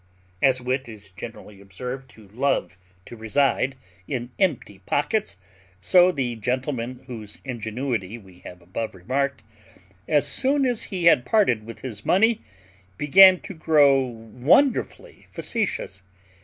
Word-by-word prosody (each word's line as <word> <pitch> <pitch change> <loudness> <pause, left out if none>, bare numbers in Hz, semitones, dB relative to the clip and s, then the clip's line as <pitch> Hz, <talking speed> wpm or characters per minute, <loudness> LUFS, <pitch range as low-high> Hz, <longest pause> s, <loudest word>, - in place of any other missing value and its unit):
As 130 -2 +3
wit 125 0 -3
is 105 -3 -13
generally 105 0 -10
observed 125 +7 -7
to 110 -3 -17
love 125 -4 -1 0.3
to - - -10
reside 135 +4 0 0.3
in 120 -2 -4
empty 140 - -1
pockets, 200 - -1 0.4
so 180 - +5
the 130 -7 -2
gentleman 125 +1 -3
whose 110 -5 -8
ingenuity 120 -3 -4
we 95 -5 -17
have 90 -1 -12
above 95 +5 -5
remarked, 130 +6 -2 0.6
as 145 -1 +3
soon 270 - +1
as 245 -3 -1
he 185 -4 -4
had 150 -7 +6
parted 125 - +1
with 115 - -10
his 110 -5 -7
money, 225 +4 +3 0.6
began 185 +5 +7
to 200 - -8
grow 150 -4 +4
wonderfully 125 - 0
facetious. 195 - -3
130 Hz, 130 wpm, -24 LUFS, 110-150 Hz, 0.6 s, began